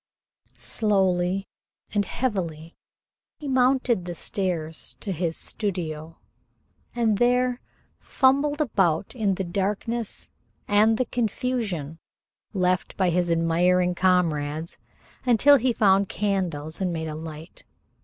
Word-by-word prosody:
Slowly 190 -3 +1 0.5
and 205 -1 +1
heavily 170 -11 -3 0.6
he 300 - -7
mounted 255 -6 +2
the 175 -1 -5
stairs 165 -4 -3
to 200 - -3
his 165 -2 -2
studio, 165 -6 -4 0.8
and 220 -4 +1
there 250 +1 +2 0.4
fumbled 285 +3 +2
about 195 - +1
in 205 -5 +1
the 190 - -2
darkness 205 +5 -2 0.4
and 215 +2 +4
the 255 - +1
confusion 220 - -2 0.5
left 185 -2 0
by 185 -2 +2
his 175 0 +1
admiring 175 +2 +2
comrades 165 -4 +1 0.5
until 260 +4 +6
he 255 0 +1
found 200 -3 +3
candles 180 -6 -2
and 185 -2 0
made 160 -1 -3
a 155 - -4
light. 160 +1 -9
190 Hz, 110 wpm, -25 LUFS, 170-225 Hz, 0.8 s, until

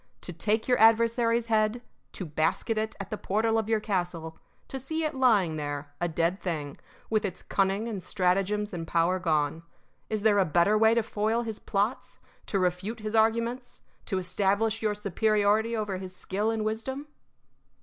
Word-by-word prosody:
To 175 - -5
take 215 +6 0
your 250 -1 +3
adversary's 230 +1 +4
head, 220 0 +1 0.3
to 185 - -5
basket 160 +8 0
it 220 0 -2
at 195 -1 -7
the 215 - -3
portal 225 +3 +1
of 220 0 -3
your 220 -1 +3
castle, 175 -6 -3 0.3
to 270 - -5
see 315 +5 -3
it 310 - -1
lying 210 - +3
there, 145 -1 -5
a 175 - +2
dead 170 +3 0
thing, 150 -6 -3 0.4
with 215 -1 +2
its 185 -3 -4
cunning 195 +3 0
and 210 -5 -4
stratagems 195 +4 0
and 165 -2 -5
power 170 +3 +2
gone 160 -2 0 0.5
Is 215 -2 -2
there 210 -2 +4
a - - +5
better 175 +5 +3
way 220 +1 +5
to 235 - +2
foil 220 +2 0
his 220 -2 -5
plots, 205 +5 -2 0.3
to 200 - 0
refute 190 +5 -1
his 215 0 -4
arguments, 230 +3 +1 0.3
to 190 - -1
establish 200 +4 0
your 210 -1 0
superiority 210 +2 +1
over 210 -3 -2
his 185 0 -8
skill 205 +4 -2
and 220 -1 -1
wisdom? 260 +6 -3
210 Hz, 175 wpm, -28 LUFS, 180-225 Hz, 0.5 s, a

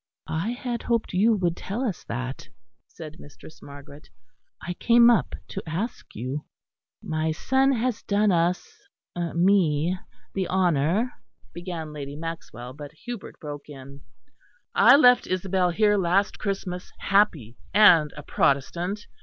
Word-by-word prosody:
"I 160 +6 -2
had 245 -1 -4
hoped 230 -4 -1
you 215 +5 +4
would 175 -4 0
tell 215 +9 -4
us 205 -8 -3
that," 130 +2 -5 0.4
said 160 0 -11
Mistress 145 +2 -14
Margaret; 145 +1 -13 0.5
"I 175 +3 -5
came 235 +5 +5
up 230 - +1
to 195 - -5
ask 190 +10 -5
you." 130 +6 -4 0.6
"My 155 0 -1
son 265 +11 +2
has 245 -2 -1
done 205 0 +2
us 175 +1 0 0.6
me 175 -2 +3 0.4
the 190 -2 -1
honour 180 - +1 0.2
" - - -34
began 170 -3 -6
Lady 140 -1 -7
Maxwell; 155 -6 -7
but 145 0 -9
Hubert 240 -4 -7
broke 145 -2 -8
in: 140 0 -11 0.7
"I 250 +4 +7
left 250 -4 +5
Isabel 185 0 0
here 210 +3 +3
last 190 +2 +1
Christmas 190 -3 -4
happy 165 - +1 0.2
and 170 -7 +6
a 150 - -8
Protestant. 175 +11 0
175 Hz, 135 wpm, -25 LUFS, 150-210 Hz, 0.7 s, I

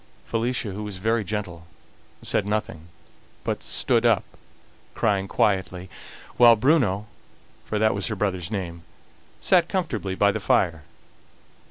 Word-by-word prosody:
Felicia, 115 -1 -1
who 100 +3 -6
was 105 -3 -6
very 110 +3 +1
gentle, 95 -4 -5 0.6
said 100 - +1
nothing, 105 -6 -3 0.6
but - - -2
stood - - +1
up - - +4 0.7
crying 100 -3 +1
quietly; 95 -2 0 0.5
while 120 -1 +8
Bruno, 110 - +2 0.6
for 110 - -2
that 110 +1 +3
was 100 -1 -1
her 110 - -2
brother's 95 -4 -2
name, 85 -5 -4 0.6
sat 175 -3 +3
comfortably 120 - -2
by 100 +1 +4
the - - -3
fire. 80 -2 +1
105 Hz, 130 wpm, -24 LUFS, 95-110 Hz, 0.7 s, while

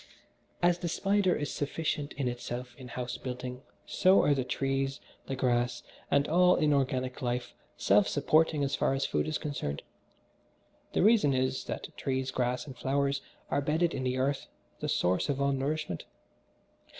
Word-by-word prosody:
As 175 0 +4
the 175 - -2
spider 195 +2 +2
is 145 - -3
sufficient 145 0 -2
in 140 -3 -2
itself 120 0 -4
in 130 -1 -10
house 125 0 -4
building, 125 0 -5 0.2
so 185 +1 +4
are 145 - +4
the 135 -2 0
trees, 135 +1 -1 0.3
the 135 - -2
grass 120 -1 0 0.3
and 140 0 +3
all 180 +2 +5
inorganic 130 -4 +1
life 125 0 -2 0.2
self 100 +1 +4
supporting 150 0 +2
so 135 - -1
far - - +2
as 135 - 0
food - - 0
is 155 - 0
concerned. 135 - -4 1.1
The - - +2
reason 205 - +5
is, 130 0 0
that - - -6
trees, 130 -1 -1
grass 125 0 -1
and 135 -4 -9
flowers 140 +1 0 0.3
are 140 - +2
bedded 160 +4 +1
in 135 -2 -3
the 130 0 0
earth, 135 +2 0 0.3
the - - -3
source 90 +7 +1
of 140 -1 0
all 140 0 +2
nourishment. 140 - -2
135 Hz, 160 wpm, -30 LUFS, 125-150 Hz, 1.1 s, all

